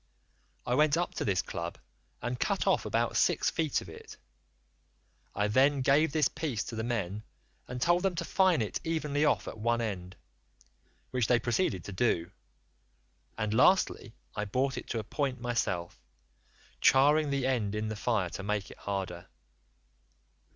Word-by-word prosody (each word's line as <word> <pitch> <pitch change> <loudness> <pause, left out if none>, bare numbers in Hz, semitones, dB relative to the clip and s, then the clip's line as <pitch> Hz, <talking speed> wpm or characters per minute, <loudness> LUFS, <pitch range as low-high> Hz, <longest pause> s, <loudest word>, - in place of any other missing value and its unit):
I 125 - 0
went 150 +3 +4
up 175 - -1
to - - -3
this 95 -3 +1
club 85 0 -5 0.5
and 120 0 -3
cut - - 0
off - - +2
about - - 0
six - - +2
feet 155 -4 0
of - - -11
it; 80 - -11 1.2
I 105 - +1
then 135 +5 +3
gave 140 +4 +3
this 150 -2 +3
piece 150 -10 -3
to 115 - -7
the 110 - -2
men 105 -4 -2 0.5
and 125 0 -5
told 175 +6 +3
them 190 -2 0
to 170 0 -3
fine 185 -10 +3
it 105 - -3
evenly 150 -2 0
off - - +1
at 110 - -7
one 115 +2 +1
end, 95 -5 -4 1.0
which 125 -4 +1
they 120 - +4
proceeded 120 - 0
to 100 - -7
do, 95 -4 0 1.1
and 110 0 -1
lastly 130 - +3 0.2
I 105 - -2
brought 130 +6 0
it - - -6
to 115 - -3
a 110 - -2
point 135 +3 -2
myself, 115 -8 -2 0.8
charring 145 +3 +5
the 140 -2 0
end 115 -6 0
in 110 0 -2
the 110 - -3
fire 105 -5 0
to - - -5
make 100 0 -2
it - - -14
harder. 95 -3 -4
120 Hz, 165 wpm, -30 LUFS, 105-145 Hz, 1.2 s, charring